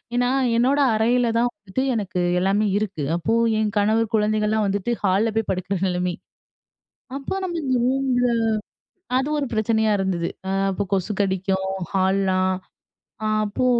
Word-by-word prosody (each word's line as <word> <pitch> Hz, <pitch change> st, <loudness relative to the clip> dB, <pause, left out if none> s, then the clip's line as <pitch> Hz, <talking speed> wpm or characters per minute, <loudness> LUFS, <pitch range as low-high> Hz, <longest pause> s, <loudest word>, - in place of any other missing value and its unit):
ஏனா, 245 Hz, 0 st, +2 dB, 0.3 s
என்னோட 265 Hz, +5 st, +3 dB
அறையில 235 Hz, +2 st, +2 dB
தான் 240 Hz, +1 st, +3 dB
வந்துட்டு 205 Hz, +4 st, -4 dB
எனக்கு 195 Hz, -5 st, -2 dB, 0.2 s
எல்லாமே 200 Hz, +3 st, +2 dB
இருக்கு. 200 Hz, -7 st, -3 dB
அப்போ 175 Hz, +6 st, -1 dB, 0.3 s
என் 215 Hz, -1 st, 0 dB
கணவர் 215 Hz, +2 st, +2 dB
குழந்தைங்கலாம் 215 Hz, 0 st, +2 dB
வந்துட்டு 200 Hz, +4 st, -1 dB
ஹால்ல 200 Hz, +3 st, +2 dB
போய் 225 Hz, -2 st, +1 dB
படுக்கிற 185 Hz, +1 st, -2 dB
நிலமை. 180 Hz, -1 st, -1 dB, 1.0 s
அப்ப 280 Hz, +8 st, -3 dB
நம்ம 345 Hz, -2 st, -3 dB
இந்த 260 Hz, -2 st, +1 dB
ரூம்ல 255 Hz, -2 st, +1 dB, 0.9 s
அது 265 Hz, +3 st, 0 dB
ஒரு 280 Hz, -, -1 dB
பிரச்சனையா 220 Hz, 0 st, +1 dB
இருந்தது. 185 Hz, -3 st, -1 dB, 0.2 s
ஆ -, -, -1 dB, 0.2 s
அப்போ 190 Hz, -, -2 dB
கொசு 195 Hz, +2 st, 0 dB
கடிக்கும் 190 Hz, 0 st, -1 dB, 0.3 s
ஹால்லாம், 190 Hz, -1 st, +2 dB, 0.9 s
அப்போ 210 Hz, +5 st, -1 dB
210 Hz, 135 wpm, -23 LUFS, 190-235 Hz, 1.0 s, என்னோட